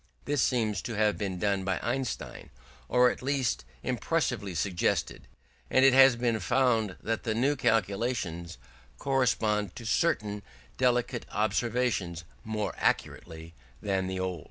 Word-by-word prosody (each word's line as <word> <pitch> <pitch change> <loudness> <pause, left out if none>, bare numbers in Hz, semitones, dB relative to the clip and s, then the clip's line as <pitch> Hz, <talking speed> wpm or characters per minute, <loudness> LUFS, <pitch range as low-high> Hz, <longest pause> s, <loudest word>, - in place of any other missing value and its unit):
This 145 -2 0
seems 110 -7 +1
to 115 - -5
have 105 0 +2
been 95 -3 -3
done 100 0 0
by 95 -1 0
Einstein, 125 +2 -3 0.4
or 125 0 +5
at - - -8
least 135 - -1 0.2
impressively 95 -3 -1
suggested: 85 +2 -1 0.4
and 130 - +4
it 135 - +6
has 135 -1 +7
been 120 -2 0
found 120 -6 +1
that 115 0 -1
the 110 -2 -2
new 135 +6 +2
calculations 100 - -1 0.4
correspond 110 - 0
to 120 - -9
certain 105 -6 0 0.3
delicate 125 -1 0
observations 105 -5 -1 0.2
more 110 -1 -3
accurately 80 -1 -2 0.3
than 95 -2 -1
the 95 0 -3
old. 95 -2 -2
110 Hz, 130 wpm, -29 LUFS, 95-125 Hz, 0.4 s, has